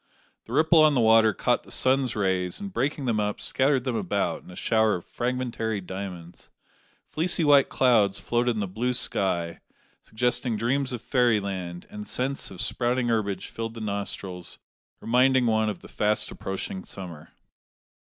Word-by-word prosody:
The 115 - -9
ripple 160 +3 +5
on 150 -2 +5
the - - +3
water 110 -1 +5
caught - - 0
the - - -16
sun's 130 -1 +2
rays, 95 -3 0
and, 200 -1 -7
breaking 140 +1 -1
them 115 -3 +1
up, 105 0 -1
scattered 135 -1 +1
them 130 -3 -2
about 100 -6 -1
in - - -16
a 90 - -10
shower 110 +1 +2
of 90 - -7
fragmentary 120 -3 -2
diamonds. 90 -2 -8 0.6
Fleecy 170 +1 0
white 145 -2 +5
clouds 110 -7 +3
floated 120 0 0
in 105 - -2
the 100 - -2
blue 120 +7 -1
sky, 85 -8 -1 0.4
suggesting 125 0 -1
dreams 130 +5 0
of 120 -2 -5
fairy 120 -5 +3
land, 90 -3 -5
and 105 0 -7
scents 135 +2 -2
of 95 - -7
sprouting 120 0 0
herbage 105 -4 -1
filled 115 0 -5
the - - -7
nostrils, 100 -4 -5 0.4
reminding 130 +2 +3
one 110 -1 +2
of 105 - -6
the - - -12
fast 105 0 0
approaching 95 -1 -5
summer. 85 -5 -9
110 Hz, 165 wpm, -26 LUFS, 100-125 Hz, 0.6 s, ripple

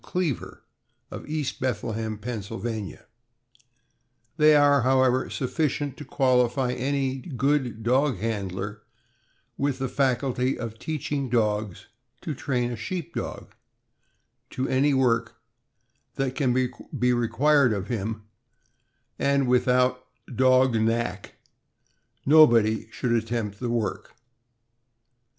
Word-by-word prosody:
Cleaver, 175 -9 -3 0.5
of - - -8
East 155 -3 -3
Bethlehem, 110 -3 -2
Penn. 110 +1 -5 2.0
They 155 -1 +6
are, 145 -1 +5
however, 130 0 +2
sufficient 145 +1 -2
to 150 - -8
qualify 125 -1 +2
any 135 +1 -1
good 130 - -1
dog 130 +1 +2
handler 105 0 -4 0.8
with 140 -1 0
the 135 0 -2
faculty 130 -1 0
of 115 -1 -6
teaching 145 -3 -3
dogs 105 -4 -1 0.4
to 155 - -4
train 125 -3 -2
a - - -3
Sheep 165 +9 -5
Dog - - -6 1.0
to 130 +1 -3
any 135 +2 +2
work 120 -3 +1 0.8
that 135 -1 -1
can 130 -3 +1
be 125 0 -1
required 125 +3 +3
of 100 -2 -3
him; 110 -1 -3 1.0
and 140 -1 +2
without 125 0 +2 0.3
"dog 130 0 +4
knack" 115 -3 -2 0.9
nobody 120 -8 +5
should 120 +2 -3
attempt 115 -3 -1
the 125 - -3
work. 115 -2 -3
125 Hz, 105 wpm, -25 LUFS, 115-135 Hz, 2.0 s, They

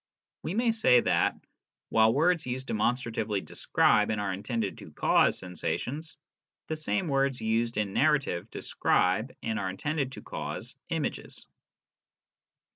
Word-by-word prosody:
We 175 - -3
may 235 +1 +3
say 220 - +5
that, - - +2 0.5
while 110 0 +5
words 160 +4 +2
used 130 +1 -3
demonstratively 110 -3 0
describe 105 - +2
and 110 -1 0
are 100 -2 -1
intended 105 +1 -3
to - - -10
cause - - +3
sensations, 130 - -4 0.5
the 160 - -3
same 155 -4 -1
words 135 -2 +1
used 115 +1 0
in 105 -2 -1
narrative 135 - +1
describe - - +1
and 110 -1 -1
are 95 -2 -2
intended 135 +7 -2
to - - -9
cause - - -6
images. - - -3
120 Hz, 130 wpm, -29 LUFS, 105-150 Hz, 0.5 s, say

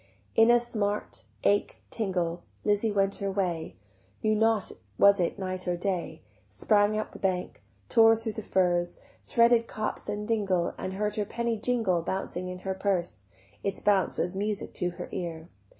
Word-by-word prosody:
In 225 +1 +6
a 240 0 +7
smart, 210 -3 -3 0.2
ache, 205 0 +1
tingle, 180 -5 -1 0.2
Lizzie 210 +1 +2
went 195 -1 +1
her 200 - -2
way; 180 -5 -2 0.5
Knew 215 - +3
not 220 -1 +2 0.3
was 200 0 +6
it 175 - 0
night 185 -1 -4
or 175 0 0
day; 185 -1 -3 0.3
Sprang 210 0 +3
up 215 - -3
the - - -11
bank, 185 -2 -2 0.3
tore 225 -1 +6
thro' 225 0 -4
the 220 +1 -6
furze, 175 -3 +1 0.3
Threaded 235 0 +4
copse 215 0 -4
and 210 0 -3
dingle, 195 -6 +1
And 185 - -5
heard 210 +2 -2
her 210 - 0
penny 235 +2 -1
jingle 220 -6 +1
Bouncing 180 0 -3
in 180 - -5
her 190 - 0
purse, 175 - -2 0.4
Its 195 -1 -2
bounce 200 -2 +2
was 180 +2 -1
music 205 +1 -3
to 180 - -1
her 175 - -7
ear. 165 -1 -5
200 Hz, 165 wpm, -28 LUFS, 180-215 Hz, 0.5 s, a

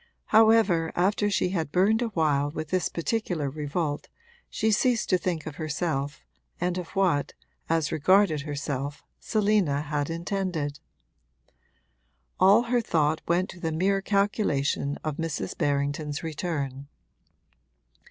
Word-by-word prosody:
However, 215 -7 +5
after 205 +3 +2
she 195 -2 +1
had 165 -6 -2
burned 205 +6 +3
a 240 - +1
while 150 -8 +1
with 155 0 -5
this 185 -1 0
particular 170 - -2
revolt 150 +1 -3 0.4
she 220 - 0
ceased 235 +1 +1
to 185 - +5
think 170 -3 -2
of 150 -2 -7
herself 150 -2 -3 0.3
and 180 +1 -1
of 175 - -6
what, 180 -7 +1 0.4
as 160 -2 +1
regarded 175 0 +3
herself, 145 -1 -4 0.2
Selina 205 -9 +1
had 145 -1 -2
intended: 165 -4 -3 1.6
all 200 +5 +6
her 240 0 +1
thought 155 -6 +1
went 175 +2 +2
to 180 - -13
the 165 -2 -2
mere 195 +5 +1
calculation 195 -9 0
of 155 -2 -3
Mrs. 165 -3 -3
Berrington's 145 +1 -1
return. 145 -4 -4
165 Hz, 125 wpm, -27 LUFS, 145-195 Hz, 1.6 s, all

